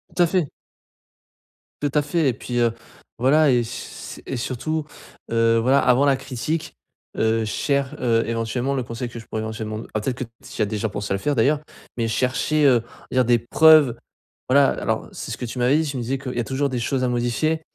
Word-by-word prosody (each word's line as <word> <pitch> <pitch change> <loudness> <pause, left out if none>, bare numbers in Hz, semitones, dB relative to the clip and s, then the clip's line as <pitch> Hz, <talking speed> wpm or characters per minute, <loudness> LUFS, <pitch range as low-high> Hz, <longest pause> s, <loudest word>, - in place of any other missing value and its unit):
Tout 180 - +2
à - - +4
fait. 170 -4 0 1.3
Tout 145 - 0
à 150 - +4
fait 150 +1 0
et 125 - 0
puis, 120 +2 -4
heu, 115 -1 +2 0.5
voilà 145 +3 +4
et 125 - +4
s 115 0 -7
s - - -14
et - - -4
surtout, 150 +6 -2 0.5
heu, 115 0 +3
voilà 130 +4 +4
avant 125 +3 +4
la 135 -2 +3
critique, 150 +6 -4 0.4
heu, 110 0 +1
cher 140 +5 -1
heu, 115 -2 +2
éventuellement 115 +4 -1
le 130 - -1
conseil 115 +1 -5
que 115 - -9
je 115 - -9
pourrais 110 - -4
éventuellement 110 -1 -4
d - - -9
ah 110 - -1
peut-être 125 +3 -2
que 130 - -3 0.2
tu - - -10
y - - +2
as - - +4
déjà 105 +1 -2
pensé 100 0 -3
à - - +2
le 100 - -3
faire 145 +4 0
d'ailleurs 145 +6 +2 0.3
mais 115 -2 -1
chercher, 135 +6 +1
heu, 125 -4 +5
on - - -19 0.2
va 130 - +5
dire - - -4
des 120 0 +4
preuves, 150 +1 +6 0.5
voilà 140 0 +5
alors - - -1
c'est - - -6
ce - - -4
que 125 - -4
tu 120 - -7
m'avais 125 +4 +4
dit, 160 - 0
tu 140 - -5
me - - -2
disais 130 +4 -2
qu'il 130 -1 -6
y - - -1
a 120 - +1
toujours 135 +5 -1
des 125 - -2
choses 130 +2 -1
à - - +1
modifier 125 +7 0
125 Hz, 235 wpm, -22 LUFS, 115-140 Hz, 1.3 s, preuves